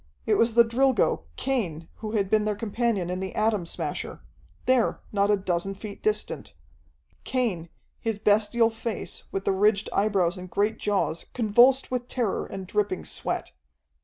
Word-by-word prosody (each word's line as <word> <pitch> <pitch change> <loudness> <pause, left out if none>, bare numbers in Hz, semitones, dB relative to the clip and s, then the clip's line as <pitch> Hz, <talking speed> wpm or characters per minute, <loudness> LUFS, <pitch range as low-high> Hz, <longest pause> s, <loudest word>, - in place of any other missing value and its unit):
It - - +2
was 230 -1 +3
the 235 - +8
Drilgo, 235 - +2
Cain, 175 - -2
who 215 -1 -5
had 200 -3 +1
been 215 +2 +3
their 210 -1 0
companion 210 -3 -1
in 180 - -2
the 190 0 -5
Atom 215 -5 +1
Smasher - - -4 0.4
there, 255 -2 +2
not 200 -1 +2
a 205 - +4
dozen 190 0 -2
feet 200 +1 -8
distant. 430 0 -2 0.7
Cain, 210 -11 -1 0.3
his 225 -2 -2
bestial 215 +2 +3
face, 225 -1 -5
with 195 0 -3
the - - +3
ridged 205 +1 +2
eyebrows 195 -3 +1
and 180 0 -8
great 210 +4 0
jaws 200 -5 -1
convulsed 245 +4 +4
with 250 -1 -2
terror 240 -6 -1
and 190 -1 -6
dripping 200 -1 -1
sweat. - - -3
210 Hz, 160 wpm, -26 LUFS, 195-230 Hz, 0.7 s, the